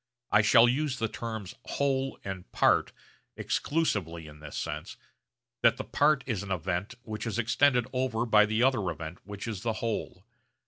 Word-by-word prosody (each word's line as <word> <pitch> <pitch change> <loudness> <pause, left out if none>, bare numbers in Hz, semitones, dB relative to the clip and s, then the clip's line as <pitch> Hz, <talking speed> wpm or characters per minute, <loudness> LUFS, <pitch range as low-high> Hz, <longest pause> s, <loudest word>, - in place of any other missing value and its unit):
I 105 - +6
shall 115 +3 +6
use 135 +1 0
the 115 - 0
terms 110 -4 -6
'whole' 135 -1 -1
and 95 -9 -7
'part' - - +3 0.5
exclusively 95 - -1
in 75 -1 -12
this 75 -1 -8
sense, 75 +1 -5 0.6
that - - +5
the - - -3
'part' 145 -2 +2
is 115 -7 -2
an 100 - -7
event 95 +4 -2
which 110 0 -5
is 115 - -2
extended 120 +2 +3
over 125 -3 0
by 105 -2 +5
the 110 +2 +1
other 120 -8 +2
event 85 +1 -6
which 100 +2 -7
is 105 -4 -4
the 115 0 -1
'whole.' 110 -4 -4
110 Hz, 170 wpm, -29 LUFS, 95-125 Hz, 0.6 s, I